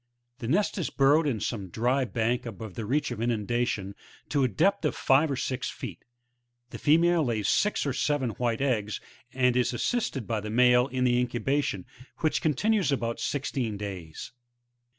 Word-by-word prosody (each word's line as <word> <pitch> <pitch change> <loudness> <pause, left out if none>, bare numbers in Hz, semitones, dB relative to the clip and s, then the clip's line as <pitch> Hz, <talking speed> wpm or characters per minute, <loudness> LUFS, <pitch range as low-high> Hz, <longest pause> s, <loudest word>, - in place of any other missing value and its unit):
The 115 - -5
nest 200 - +1
is 170 - -1
burrowed 145 +3 +3
in 120 -6 -1
some 105 -2 -3
dry 125 +7 +1
bank 120 +1 -1
above 110 -2 -7
the 110 0 -5
reach 145 +6 0
of 110 - -4
inundation,' 115 -3 -1 0.4
to 145 -2 +2
a - - +4
depth 185 - +1
of 150 - 0
five 140 +4 +3
or 140 - -1
six 130 -1 -2
feet. - - -8 0.7
Ttie'female 165 +2 +3
lays 110 -6 -1
six 210 -5 +2
or 140 - 0
seven 140 -3 0
white 115 +2 -1
eggs, 110 -6 0 0.3
and 125 -1 +2
is 125 0 +1
assisted 135 - -1
by 110 -1 -1
the 105 - -6
male 125 +2 +4
in 130 -2 -2
the 120 -1 +3
incubation, 125 -4 -1 0.3
which 155 -2 0
continues 195 - +1
about 115 -4 -1
sixteen 125 -6 -2
days, 95 -6 -7
13. 125 - -47
125 Hz, 170 wpm, -27 LUFS, 115-145 Hz, 0.7 s, a